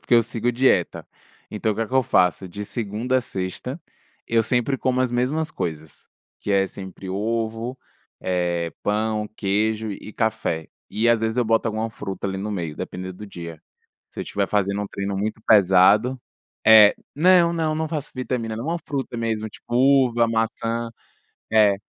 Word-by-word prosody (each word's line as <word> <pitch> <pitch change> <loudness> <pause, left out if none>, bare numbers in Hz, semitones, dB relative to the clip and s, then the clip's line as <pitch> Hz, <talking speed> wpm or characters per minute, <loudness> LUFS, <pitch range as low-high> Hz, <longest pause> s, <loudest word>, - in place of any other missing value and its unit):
porque - - +1
eu 115 - +6
sigo 120 +1 -1
dieta, 130 +2 +2 0.5
então 110 +1 -1
o - - -6
que 115 - -4
é 115 - 0
que - - -16
eu 130 - +5
faço? 90 -1 +2
De 105 +4 -6
segunda 115 +4 -2
à - - +3
sexta, 120 - -5 0.5
eu 115 -1 +3
sempre 125 +3 +1
como 130 0 0
as 130 -1 +1
mesmas 140 +6 0
coisas, 80 - -6 0.3
que 105 - -2
é 95 -1 +3
sempre 95 -1 -8
ovo, 115 +4 -2 0.4
eh, 85 -2 -1
pão, 105 +1 0
queijo 110 +2 0
e 105 +1 -8
café, 85 -7 -1 0.2
e 115 +2 +1
às 120 -1 +5
vezes 110 +1 -1
eu 125 - +2
boto 115 +1 +2
alguma 110 +1 -2
fruta 95 -2 -5
ali 95 - -3
no 105 +2 -3
meio 85 -6 -4
dependendo 95 0 -6
do 105 +3 -9
dia. 85 -4 -9 0.5
Se - - -8
eu - - -3
tiver 100 -1 -1
fazendo 100 0 0
um 105 - -4
treino 100 0 -4
muito 110 +3 -2
pesado 105 +5 +5 0.5
eh, 105 -1 +8 0.2
não 175 +2 +5
não 160 -2 0
não 160 0 -2
faço 150 -3 -4
vitamina, 125 -3 -3
não 115 +6 -5
é - - -3
uma - - -2
fruta 135 -4 -3
mesmo 110 -1 -2
tipo 120 - -9
uva, 125 -3 +4
maçã, 115 +1 -1 0.6
é, 105 -2 +5
110 Hz, 180 wpm, -23 LUFS, 100-120 Hz, 0.6 s, eh